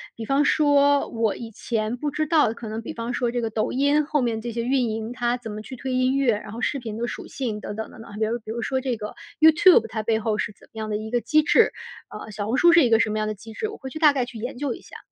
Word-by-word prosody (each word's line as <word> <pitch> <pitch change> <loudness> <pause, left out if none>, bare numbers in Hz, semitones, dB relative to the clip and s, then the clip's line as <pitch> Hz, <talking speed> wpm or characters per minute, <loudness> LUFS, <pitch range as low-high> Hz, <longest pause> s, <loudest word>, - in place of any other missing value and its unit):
比 225 - -6
方 275 +4 +2
说 285 -1 +4
我 225 -2 0
以 230 - -7
前 220 +1 -2
不 295 +4 -3
知 310 +2 -1
道 310 0 +4
的， - - -3
可 235 - -8
能 220 +1 -4
比 230 - -7
方 230 +1 -4
说 240 -1 0
这 245 - -1
个 225 - -1
抖 215 0 -1
音 285 +3 +2
后 300 -1 0
面 230 -3 -1
这 235 +1 -4
些 230 +1 -3
运 250 -1 +1
营， 220 +2 -4
它 245 0 0
怎 240 -2 -8
么 210 +1 -6
去 220 +5 -9
推 260 +1 -4
音 255 +1 +2
乐， 265 -4 +3
然 210 0 -9
后 225 - -7
视 285 - 0
频 220 -4 -6
的 235 +1 -2
属 - - -6
性 225 -6 -4
等 - - -5
等 220 - -4
等 225 - -12
等。 225 - -12
还 205 - -9
比 220 - +2
如 230 +2 -1
比 220 -1 -8
如 235 +1 -3
说 260 +1 -1
这 255 -3 -2
个 210 -1 -6 0.3
YouTube 320 - +7
它 220 0 -4
背 220 0 +1
后 215 -1 -1
是 215 - -2
怎 - - -19
么 - - -13
样 215 0 -4
的 210 - -1
一 215 +1 -6
个 240 -1 +1
机 310 +5 +3
制， 340 +3 +4 0.4
呃， 215 - -9
小 205 0 -4
红 240 +4 0
书 345 +3 +6
是 335 - +7
一 245 - +3
个 225 -1 +5
什 225 -2 +2
么 215 - -2
样 215 0 -1
的 - - -2
机 220 +2 -12
制， 430 - -3
我 430 - -8
会 265 - -7
去 285 - -8
大 305 -2 +7
概 265 -3 -1
去 245 - -10
研 245 +4 -5
究 275 -2 -2
一 - - -11
下。 - - -12
235 Hz, 370 characters per minute, -24 LUFS, 220-275 Hz, 0.4 s, YouTube